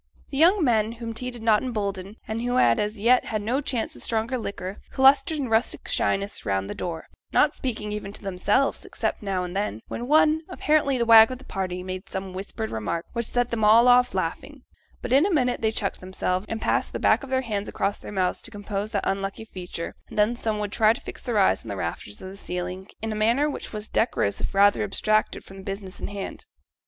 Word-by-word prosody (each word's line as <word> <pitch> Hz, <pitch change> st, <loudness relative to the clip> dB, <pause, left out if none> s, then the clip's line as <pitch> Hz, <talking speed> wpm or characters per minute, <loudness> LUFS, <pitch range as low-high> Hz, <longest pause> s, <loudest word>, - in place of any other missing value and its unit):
The 275 Hz, -, -3 dB
young 355 Hz, +3 st, +5 dB
men, 225 Hz, -4 st, +2 dB
whom 230 Hz, -1 st, -6 dB
tea 250 Hz, +3 st, -2 dB
did 240 Hz, -2 st, -8 dB
not 220 Hz, -2 st, +4 dB
embolden, 200 Hz, -5 st, -3 dB
and 220 Hz, +1 st, -3 dB
who 245 Hz, +1 st, -1 dB
had 120 Hz, -, +4 dB
as 210 Hz, +1 st, -2 dB
yet 245 Hz, +4 st, +4 dB
had 215 Hz, -2 st, -2 dB
no 250 Hz, +6 st, 0 dB
chance 255 Hz, -5 st, -2 dB
of -, -, -7 dB
stronger 225 Hz, +3 st, -1 dB
liquor, 200 Hz, -4 st, -5 dB
clustered 270 Hz, +3 st, +4 dB
in 275 Hz, -3 st, -2 dB
rustic 225 Hz, +1 st, 0 dB
shyness 200 Hz, +1 st, 0 dB
round 95 Hz, -2 st, -1 dB
the -, -, -4 dB
door, 165 Hz, -2 st, -5 dB, 0.3 s
not -, -, +4 dB
speaking 215 Hz, -5 st, -4 dB
even 210 Hz, -1 st, -5 dB
to -, -, -9 dB
themselves, 200 Hz, +7 st, +1 dB
except -, -, -3 dB
now 195 Hz, -3 st, -1 dB
and 180 Hz, +1 st, -6 dB
then, 200 Hz, -, -1 dB
when 240 Hz, -, -4 dB
one, 310 Hz, +1 st, +4 dB
apparently 300 Hz, -6 st, +2 dB
the 235 Hz, -, +1 dB
wag 225 Hz, -1 st, +9 dB
of 255 Hz, -, -5 dB
the 265 Hz, -, -16 dB
party, 180 Hz, -2 st, -3 dB
made 185 Hz, +3 st, -6 dB
some 190 Hz, -1 st, -5 dB
whispered 205 Hz, +4 st, -5 dB
remark, 110 Hz, +10 st, -3 dB
which 235 Hz, -1 st, -2 dB
set 245 Hz, 0 st, 0 dB
them 225 Hz, -2 st, -1 dB
all 225 Hz, +3 st, +7 dB
off 250 Hz, -3 st, +5 dB
laughing; 245 Hz, -, -3 dB, 0.4 s
but 245 Hz, -, -1 dB
in 275 Hz, +3 st, +6 dB
a 395 Hz, -, +2 dB
minute 250 Hz, -7 st, +1 dB
they 220 Hz, -1 st, +2 dB
checked 205 Hz, -3 st, -3 dB
themselves, 185 Hz, +1 st, -2 dB
and 225 Hz, 0 st, -4 dB
passed -, -, +1 dB
the -, -, -3 dB
back -, -, +4 dB
of 275 Hz, -, -8 dB
their 260 Hz, 0 st, +1 dB
hands 210 Hz, -5 st, -3 dB
across 200 Hz, +1 st, -1 dB
their -, -, -9 dB
mouths 185 Hz, -3 st, 0 dB
to -, -, -5 dB
compose 205 Hz, -1 st, -4 dB
that 205 Hz, -3 st, -2 dB
unlucky 195 Hz, +3 st, -2 dB
feature, 180 Hz, -4 st, -6 dB, 0.2 s
and -, -, -10 dB
then 210 Hz, +3 st, +3 dB
some 220 Hz, -2 st, -1 dB
would 210 Hz, -1 st, -3 dB
try 220 Hz, 0 st, +4 dB
to -, -, -10 dB
fix -, -, -9 dB
their 240 Hz, -4 st, -2 dB
eyes 195 Hz, -, +4 dB
on 115 Hz, -, -9 dB
the 100 Hz, -, -4 dB
rafters 95 Hz, +4 st, -5 dB
of 190 Hz, -, -8 dB
the 195 Hz, -, -10 dB
ceiling, 180 Hz, 0 st, -5 dB, 0.2 s
in 220 Hz, -, -2 dB
a -, -, -2 dB
manner 230 Hz, +7 st, +2 dB
which 295 Hz, -, -5 dB
was 215 Hz, 0 st, -5 dB
decorous 160 Hz, -, 0 dB
if -, -, -3 dB
rather 200 Hz, +1 st, +5 dB
abstracted 215 Hz, +1 st, 0 dB
from 195 Hz, -, -13 dB
the 190 Hz, -, -10 dB
business 195 Hz, -1 st, -6 dB
in -, -, -4 dB
hand. 205 Hz, -, -7 dB
215 Hz, 230 wpm, -25 LUFS, 195-245 Hz, 0.4 s, wag